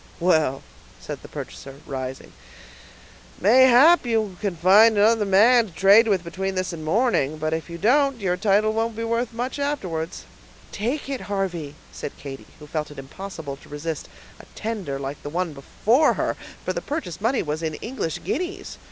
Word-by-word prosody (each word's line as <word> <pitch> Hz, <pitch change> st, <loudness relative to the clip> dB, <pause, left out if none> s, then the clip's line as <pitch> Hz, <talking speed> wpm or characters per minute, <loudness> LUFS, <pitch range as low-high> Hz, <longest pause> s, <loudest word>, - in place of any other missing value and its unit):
"Well," 155 Hz, -6 st, +2 dB, 0.4 s
said -, -, -7 dB
the -, -, -11 dB
purchaser, 135 Hz, 0 st, -8 dB
rising, 130 Hz, -1 st, -6 dB, 1.1 s
"mayhap 260 Hz, -, +6 dB
you 220 Hz, -5 st, -1 dB
can 200 Hz, -4 st, -1 dB
find 205 Hz, +6 st, +6 dB
another 215 Hz, +1 st, +4 dB
man 220 Hz, +5 st, +5 dB
to 180 Hz, -, -15 dB
trade 200 Hz, +6 st, +6 dB
with 195 Hz, -5 st, +1 dB
between 190 Hz, +3 st, -4 dB
this 185 Hz, -1 st, -2 dB
and 160 Hz, -2 st, -7 dB
morning, 155 Hz, -, +1 dB
but 155 Hz, +1 st, -2 dB
if 160 Hz, +1 st, -4 dB
you 170 Hz, -, -6 dB
don't, 270 Hz, -, +2 dB
your 185 Hz, -3 st, 0 dB
title 210 Hz, +2 st, +2 dB
won't 225 Hz, 0 st, -1 dB
be 230 Hz, -, -4 dB
worth 230 Hz, +1 st, -1 dB
much 245 Hz, +4 st, -4 dB
afterwards." 185 Hz, -, -3 dB, 0.5 s
"Take 245 Hz, +9 st, -3 dB
it, 275 Hz, -2 st, -4 dB
Harvey," 175 Hz, -7 st, -3 dB, 0.2 s
said -, -, -7 dB
Katy, 135 Hz, -1 st, -9 dB
who 150 Hz, -, -12 dB
felt 150 Hz, +1 st, -3 dB
it 150 Hz, -, -12 dB
impossible 140 Hz, 0 st, -7 dB
to -, -, -18 dB
resist 150 Hz, +2 st, -5 dB, 0.3 s
a -, -, -13 dB
tender 205 Hz, -11 st, -4 dB
like 135 Hz, +1 st, -6 dB
the 145 Hz, -, -6 dB
one 175 Hz, +1 st, -2 dB
before 230 Hz, -, +2 dB
her; -, -, -1 dB, 0.3 s
for -, -, -1 dB
the -, -, -3 dB
purchase 280 Hz, -, -5 dB
money 235 Hz, +4 st, +1 dB
was 150 Hz, +1 st, -3 dB
in 160 Hz, -2 st, -2 dB
English 225 Hz, -, -4 dB
guineas. 365 Hz, +6 st, -4 dB
195 Hz, 175 wpm, -23 LUFS, 160-230 Hz, 1.1 s, mayhap